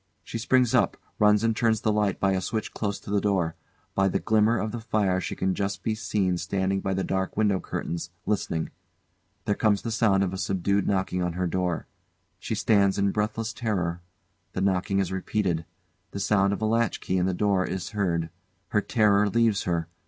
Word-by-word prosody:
She 115 - -5
springs 125 0 +3
up, - - +3 0.2
runs 105 0 +5
and 115 -1 +2
turns 110 -2 +2
the 110 - +2
light 105 -2 +1
by 95 - +2
a 95 -1 0
switch 110 +3 -3
close 100 -2 -2
to - - -8
the 100 -1 +2
door. 95 -5 0 0.4
By 95 0 +3
the - - +1
glimmer 110 +1 +3
of 110 0 -2
the 120 - -4
fire 105 -5 0
she - - -4
can 95 0 0
just 100 +1 -3
be 110 - 0
seen 95 -4 0
standing 95 +1 -1
by 95 -1 -1
the 95 - -1
dark 95 +1 -2
window 105 -3 +2
curtains, 85 -1 -4 0.2
listening. 85 -6 -1 0.7
There 105 - +2
comes 105 -1 +1
the 115 - -3
sound 105 -3 +3
of 95 0 -2
subdued 100 +2 0
knocking 95 -2 0
on 90 -1 -1
her 90 +1 -1
door. 90 -1 -1 0.5
She 110 - -3
stands 100 -2 +3
in 100 0 +2
breathless 110 +2 -2
terror. 90 -7 -2 0.5
The 95 - -2
knocking 95 0 +1
is 95 -2 0
repeated. 95 -3 -1 0.4
The 100 - -6
sound 100 -1 +2
of 100 - -2
a - - +3
latchkey 115 -4 0
in 90 - +1
the 95 - 0
door 100 -1 +2
is 95 -1 -4
heard. 85 -6 -1 0.4
Her 105 - +2
terror 105 -2 +3
leaves 115 -2 +2
her. 85 -2 -1
100 Hz, 195 wpm, -26 LUFS, 95-110 Hz, 0.7 s, runs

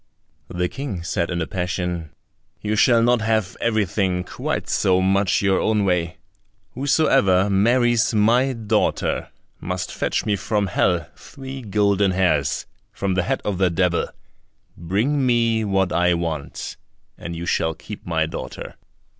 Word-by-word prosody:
The 90 0 -1
King 120 -7 -5
said 85 -1 -1
in 85 -2 -1
a - - -3
passion, 90 -2 -3 0.5
"You 105 0 -2
shall 115 +1 +4
not 120 0 +3
have 110 -4 0
everything 100 -5 0
quite - - -4
so 95 -1 +2
much 95 +1 +2
your 95 -1 +3
own 105 -2 +1
way; 90 -2 0 0.5
whosoever 125 - +3
marries 120 +4 +3
my 120 +5 +3
daughter 115 -3 0 0.3
must 90 0 -4
fetch - - -1
me 105 - +1
from 105 +2 -1
hell 90 -3 +1
three 135 0 -9
golden 100 -2 +2
hairs 80 -7 +1 0.3
from 100 -1 -2
the 90 - +1
head 90 - -1
of 100 -3 -2
the 95 -2 +3
devil; 85 0 +1 0.7
bring 110 - 0
me 115 -3 +2
what 95 -3 +1
I 90 +1 +3
want, 80 -4 -4 0.4
and 85 -2 -7
you 85 +1 -5
shall 80 -2 0
keep 100 +5 -10
my 80 -2 0
daughter." 80 - -7
95 Hz, 145 wpm, -22 LUFS, 90-110 Hz, 0.7 s, shall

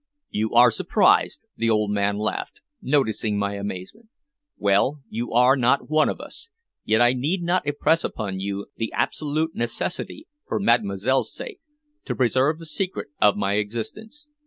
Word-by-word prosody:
"You 110 +2 -2
are 120 0 +7
surprised," - - +2
the 115 0 0
old 105 -2 +2
man 100 0 0
laughed, 105 - -3 0.2
noticing 110 -6 +1
my 100 0 -1
amazement. 100 - -7 0.5
"Well, 100 +9 +2
you 115 +2 -4
are 125 +3 +5
not 130 +3 +1
one 155 0 +4
of - - -4
us, 460 - -10 0.3
yet 110 +2 +2
I 120 +1 +5
need 155 +9 -1
not 175 -2 0
impress 150 +3 +2
upon 100 -4 -4
you 100 +1 -3
the 115 - -3
absolute 155 +2 -1
necessity, 130 - -4 0.2
for - - -1
Mademoiselle's 115 - +1
sake, 445 -6 -7 0.5
to - - -3
preserve 130 +4 +2
the 165 - -10
secret 185 +1 -3
of 105 0 +5
my 100 0 0
existence. 210 - -5
120 Hz, 155 wpm, -24 LUFS, 105-155 Hz, 0.5 s, are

